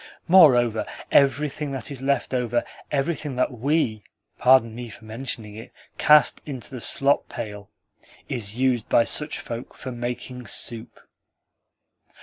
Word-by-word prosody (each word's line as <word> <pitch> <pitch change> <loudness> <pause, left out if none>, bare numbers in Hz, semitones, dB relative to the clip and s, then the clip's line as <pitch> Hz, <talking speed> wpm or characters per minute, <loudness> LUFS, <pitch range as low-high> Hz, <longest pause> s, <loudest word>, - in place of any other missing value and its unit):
Moreover, 125 - +5 0.2
everything 140 +2 +2
that 135 +1 -4
is 135 -2 -6
left 135 -1 0
over 120 -1 0 0.3
everything 145 -1 -2
that 130 - +1
WE 125 -3 0 0.4
(pardon 125 -3 +5
me 120 0 -7
for 110 - -13
mentioning 110 -2 -6
it) 110 - -10 0.3
cast 150 0 +5
into 135 -4 -8
the 125 -3 -7
slop 140 +4 +2
pail 105 -2 -7 0.6
is 110 -5 -3
used 125 -3 0
by 115 - +5
such 150 +6 0
folk 115 +1 -7
for 130 - -7
making 120 +1 -6
soup." 115 -1 -5
125 Hz, 135 wpm, -24 LUFS, 115-140 Hz, 0.6 s, Moreover